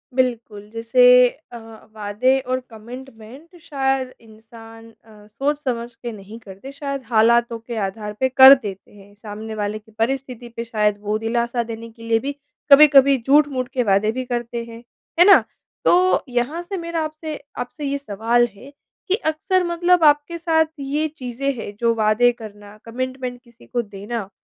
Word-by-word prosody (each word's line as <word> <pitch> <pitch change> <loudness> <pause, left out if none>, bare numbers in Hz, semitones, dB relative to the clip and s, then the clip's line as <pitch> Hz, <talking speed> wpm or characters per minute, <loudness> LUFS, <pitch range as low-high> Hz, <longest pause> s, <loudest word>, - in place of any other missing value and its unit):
बिल्कुल, 230 -5 -2
जैसे 230 +2 +2 0.5
अ, 240 - -8 0.4
वादे 215 +6 +1
और 255 0 -2
कमिटमेंट 245 +6 -12
शायद 270 -3 -2
इंसान 225 +1 -15
अ, 215 -2 -19
सोच-समझ 245 -1 -3
के 240 0 -7
नहीं 210 +1 -11
करते 200 +5 -11
शायद 275 -1 -5
हालातों 235 +1 +2
के 230 +1 -8
आधार 210 +1 -7
पे 260 - +2
कर 265 +1 +9
देते 205 -8 -5
हैं, 205 0 -17
सामने 215 +1 -8
वाले 210 0 -3
की 215 +1 -23
परिस्थिति 250 0 -3
पे 230 - -4
शायद 210 -3 0
वो 210 +1 -1
दिलासा 235 +1 -1
देने 230 0 -8
के 230 0 -16
लिए 225 0 +2
भी 280 +4 -5 0.4
कभी-कभी 280 -1 +7
झूठ-मूठ 275 -3 +3
के 250 - +1
वादे 205 0 +2
भी 255 +3 -4
करते 240 -1 -4
हैं। 230 0 -12 0.4
है 350 - +8
ना? 400 - +7 0.4
तो 365 +1 +3
यहाँ 250 +7 -2
से 380 +3 -6
मेरा 335 -1 -3
आपसे 310 0 -6 0.2
आपसे 290 +4 -6
ये 280 0 -1
सवाल 235 -1 +1
है, 260 +8 -14 0.4
कि 385 - +2
अक्सर 370 0 -1
मतलब 345 0 +2
आप 295 -1 +6
के 340 0 -6
साथ 320 -1 +2
ये 290 +3 -1
चीज़ें 260 +1 -3
हैं 205 - -7
जो 235 -1 +2
वादे 220 +3 +3
करना, 210 -3 -12
कमिटमेंट 255 +1 -5
किसी 235 -2 -21
को 240 - -1
देना, 205 0 -7
240 Hz, 165 wpm, -21 LUFS, 220-275 Hz, 0.5 s, कर